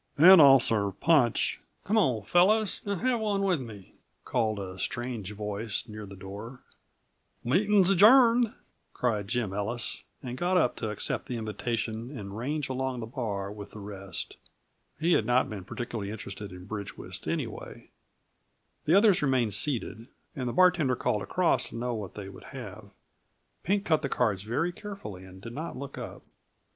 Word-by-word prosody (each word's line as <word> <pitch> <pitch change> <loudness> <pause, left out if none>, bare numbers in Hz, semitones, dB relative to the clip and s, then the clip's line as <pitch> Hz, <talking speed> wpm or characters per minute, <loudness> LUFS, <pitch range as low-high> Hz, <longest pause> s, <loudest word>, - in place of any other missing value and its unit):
And 180 +3 +9
I'll 135 -2 +9
serve 100 -5 0
punch 145 -9 +3
" - - -44
"Come 210 - 0
on, 130 - +2
fellows, 195 - +3
and 200 -3 -2
have 250 -1 +1
one 205 -2 0
with 180 -7 +1
me," 105 -6 -10 0.3
called 110 -4 0
a 95 -1 -6
strange 120 -2 -4
voice 105 +2 -4
near 105 -1 -8
the 100 - -10
door. 100 +7 -9 0.8
"Meeting's 195 - +3
adjourned," 230 +3 +6 0.4
cried 110 -5 -1
Jim 115 -3 -1
Ellis, 110 +4 -3 0.2
and 125 -1 -6
got 180 +1 +2
up 155 -9 +2
to 110 - -3
accept 105 - -2
the 125 -3 -3
invitation 115 +3 -3
and 100 -1 -7
range 140 +5 -2
along 130 -1 -2
the 115 - -4
bar 105 -5 -4
with 105 -1 -9
the 105 - -9
rest. 100 -2 -6 0.6
He 165 +3 +2
had 110 - +2
not 125 0 +2
been 100 -4 -6
particularly 110 -2 -5
interested 105 -1 -7
in 90 0 -10
bridge 100 0 -6
whist - - -8
anyway. - - -5 0.9
The 160 - +4
others 200 -2 +5
remained 130 -7 +1
seated, 115 +1 +1 0.3
and 125 -3 -2
the - - -4
bartender 180 -8 +4
called 105 -3 0
across 165 - +1
to - - -10
know 120 +1 -2
what 105 -5 -6
they 100 -2 -7
would 100 - -12
have. 110 -6 -9 0.7
Pink 200 +2 0
cut 155 -2 +2
the 140 - -2
cards 105 -8 +1
very 145 +10 0
carefully, 175 - -8
and 95 0 -13
did 115 +4 -9
not 155 +6 -5
look 140 +1 -7
up. - - -8
120 Hz, 170 wpm, -28 LUFS, 105-160 Hz, 0.9 s, And